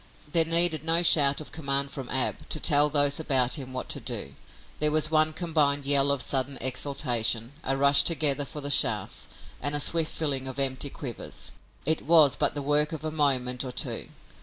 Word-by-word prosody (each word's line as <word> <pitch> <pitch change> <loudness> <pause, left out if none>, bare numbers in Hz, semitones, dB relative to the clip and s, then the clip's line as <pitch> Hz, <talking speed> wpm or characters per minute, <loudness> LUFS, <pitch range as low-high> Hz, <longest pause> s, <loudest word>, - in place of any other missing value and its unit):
There 165 0 +3
needed 165 -2 +5
no 165 +2 +2
shout 145 -4 +4
of 155 - -10
command 140 -2 -2
from 135 -4 -8
Ab 130 - -2
to 155 - -2
tell 145 -1 +3
those 145 0 +1
about 130 -5 +1
him 130 -1 -8
what 130 - -6
to - - -3
do. - - -6 0.5
There 150 - +3
was 155 0 0
one 155 0 +2
combined 150 -4 -1
yell 140 0 +3
of 140 -3 0
sudden 135 0 -1
exultation, 125 -3 0
a 135 - -2
rush 140 +1 +5
together 150 -4 +1
for 150 +2 -8
the 145 0 -3
shafts - - +1 0.3
and 145 0 -1
a - - +1
swift 165 +2 0
filling 140 -4 -3
of 130 0 -7
empty 135 0 -2
quivers. 130 -4 -8 0.3
It 160 +2 +2
was 155 -3 +4
but - - 0
the 145 - -4
work 150 +2 0
of 155 -1 -7
a 155 - -3
moment 130 -5 0
or 130 - -7
two. - - -4
145 Hz, 195 wpm, -25 LUFS, 135-155 Hz, 0.5 s, needed